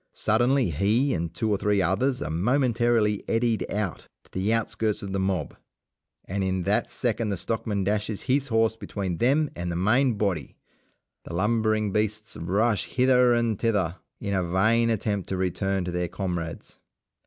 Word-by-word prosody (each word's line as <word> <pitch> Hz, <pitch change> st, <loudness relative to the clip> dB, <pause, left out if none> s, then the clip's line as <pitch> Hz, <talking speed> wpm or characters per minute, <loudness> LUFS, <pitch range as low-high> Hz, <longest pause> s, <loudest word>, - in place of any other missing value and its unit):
Suddenly 120 Hz, 0 st, +2 dB
he 110 Hz, -, +2 dB
and 85 Hz, -1 st, -2 dB
two 110 Hz, +5 st, -1 dB
or 100 Hz, -, +1 dB
three 105 Hz, -1 st, +2 dB
others 100 Hz, +9 st, +1 dB
are 75 Hz, -, -4 dB
momentarily 115 Hz, -, +2 dB
eddied 115 Hz, -1 st, 0 dB
out 100 Hz, -5 st, -3 dB, 0.2 s
to -, -, -26 dB
the 95 Hz, +4 st, -1 dB
outskirts 110 Hz, -2 st, -1 dB
of 100 Hz, -, -5 dB
the 95 Hz, -, 0 dB
mob, 95 Hz, -5 st, -1 dB, 0.7 s
and 100 Hz, +1 st, -2 dB
in 95 Hz, -1 st, -1 dB
that -, -, +1 dB
second 115 Hz, -2 st, -1 dB
the 100 Hz, -, -1 dB
stockman 105 Hz, +1 st, -2 dB
dashes 105 Hz, +1 st, -1 dB
his 135 Hz, +1 st, +1 dB
horse 115 Hz, -2 st, +2 dB
between 95 Hz, -5 st, -4 dB
them 140 Hz, +5 st, +2 dB
and 85 Hz, 0 st, -3 dB
the -, -, -3 dB
main 115 Hz, +7 st, +2 dB
body. 100 Hz, -7 st, -2 dB, 0.7 s
The 85 Hz, -, -6 dB
lumbering 110 Hz, +1 st, +1 dB
beasts 110 Hz, +1 st, -1 dB
rush 105 Hz, +6 st, 0 dB
hither 125 Hz, -1 st, +4 dB
and 115 Hz, -3 st, 0 dB
thither 95 Hz, -7 st, 0 dB, 0.2 s
in 100 Hz, -, -3 dB
a 95 Hz, -, +2 dB
vain 110 Hz, +7 st, +2 dB
attempt 105 Hz, -3 st, -1 dB
to 95 Hz, -, -1 dB
return 95 Hz, +1 st, -1 dB
to 90 Hz, -, -3 dB
their 90 Hz, 0 st, -1 dB
comrades. 85 Hz, -2 st, -5 dB
105 Hz, 165 wpm, -26 LUFS, 95-115 Hz, 0.7 s, hither